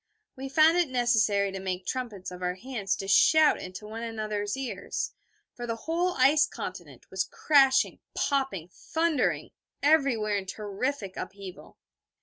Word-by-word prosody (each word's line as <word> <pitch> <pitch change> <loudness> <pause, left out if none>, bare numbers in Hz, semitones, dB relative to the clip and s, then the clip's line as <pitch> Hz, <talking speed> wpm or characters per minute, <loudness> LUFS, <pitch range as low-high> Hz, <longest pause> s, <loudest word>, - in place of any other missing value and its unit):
We 270 +1 -6
found 315 +4 +5
it 345 -5 +1
necessary 220 -5 +2
to 195 - -5
make 185 -1 -4
trumpets 225 -8 -4
of 180 0 -9
our 180 0 -1
hands 210 -2 -3
to 195 - -6
shout 310 +9 +5
into 185 +3 -8
one 220 +2 -7
another's 215 -2 -3
ears, 220 -8 -4 0.4
for 240 -1 -7
the 230 - -2
whole 335 +9 -1
ice 285 +3 +5
continent - - -8
was - - 0
crashing, 290 - +3 0.2
popping, 265 - -1
thundering 320 -3 -1 0.3
everywhere 270 -9 +3
in 190 -1 -5
terrific 205 +1 -4
upheaval. 190 -2 -9
230 Hz, 140 wpm, -28 LUFS, 200-275 Hz, 0.4 s, found